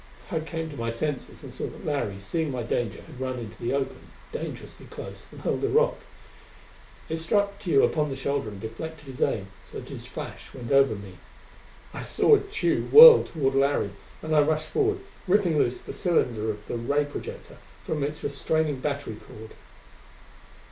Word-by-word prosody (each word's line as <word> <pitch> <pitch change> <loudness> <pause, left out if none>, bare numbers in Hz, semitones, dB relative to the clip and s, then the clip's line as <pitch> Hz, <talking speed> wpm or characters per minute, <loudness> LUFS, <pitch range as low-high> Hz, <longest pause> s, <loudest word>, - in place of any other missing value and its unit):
I 165 - 0
came 160 +1 -4
to - - -8
my 115 0 -2
senses 135 +4 -4
and - - -9
saw - - -4
that - - -10
Larry, 140 -10 -1
seeing 160 - -2
my 125 -3 -3
danger, 115 -2 -2
had 130 - -13
run 130 -1 -2
into 115 -3 -8
the 120 - -1
open, 135 -1 -3 0.2
dangerously - - -7
close, - - -9
and - - -11
hurled - - -1
a 410 - +2
rock. 475 +4 +3 1.1
It 160 - -2
struck 200 +4 0
Tugh 165 -8 +3
upon 150 -2 0
the 135 - -3
shoulder 135 -3 -2
and 100 -2 -9
deflected 145 +9 -7
his 135 -2 -9
aim, 100 -3 0
so - - -8
that - - -11
his - - -8
flash - - -8
went 120 -1 -6
over 135 -5 +5
me. 100 -2 -10 0.7
I - - -5
saw 435 - +4
Tugh 405 +1 -1
whirl 470 +1 +11
toward 135 -5 -1
Larry, 135 -7 +2 0.3
and 155 0 0
I 150 - +7
rushed 155 +1 0
forward, 410 -2 +1 0.3
ripping 180 -5 +3
loose 120 -2 +1
the - - -8
cylinder 120 - +1
of 105 -1 -5
the - - -3
ray 140 +5 +1
projector 145 - -8 0.3
from 150 -3 -2
its 150 +2 -4
restraining 145 0 0
battery 140 -5 -3
cord. 110 0 -12
140 Hz, 180 wpm, -26 LUFS, 120-160 Hz, 1.1 s, whirl